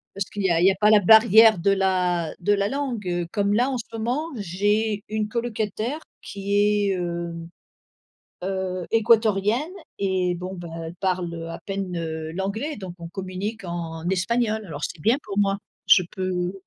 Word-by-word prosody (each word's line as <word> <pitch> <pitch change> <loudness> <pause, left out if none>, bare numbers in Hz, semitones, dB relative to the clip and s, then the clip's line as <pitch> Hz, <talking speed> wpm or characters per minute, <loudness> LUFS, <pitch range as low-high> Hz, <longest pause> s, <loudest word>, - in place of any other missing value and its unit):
Parce 195 0 -2
qu'il 205 - -5
y 190 - +2
a 165 0 +3
il 180 - +5
y - - +7
a - - +1
pas 210 - +5
la 215 -1 +7
barrière 220 0 +7
de 200 +4 +2
la 180 -4 +1
de 205 +4 +2
la 200 0 +1
langue. 260 -6 -3
Heu, 175 -1 -1
comme 205 -1 +1
là, 245 +5 +2
en 255 - -2
ce 230 0 -7
moment 245 +8 -1
j'ai 205 +2 0
une 215 0 -2
colocataire 230 +3 -2 0.2
qui 200 0 -4
est, 205 0 +3
hem, 170 -2 -4 1.0
heu, 185 -1 -2
équatorienne 225 - +3 0.3
et 185 -2 0
bon, 185 +2 -6
bah, 175 -1 -8 0.2
elle 165 +2 -7
parle, 180 -2 -1
heu, 165 0 -6
à 165 - -6
peine, 195 -2 -3
heu, 160 -1 -4
l'anglais 210 - -3
donc 185 -4 -8
on 170 - -7
communique 195 +4 -5
en 170 -2 -5
espagnol 220 +4 0
alors 150 -3 -7
c'est 160 - -4
bien 230 - +3
pour 200 -1 -6
moi. 195 -1 +2 0.3
Je 180 - +7
peux 185 -1 -2
195 Hz, 185 wpm, -24 LUFS, 180-215 Hz, 1.0 s, y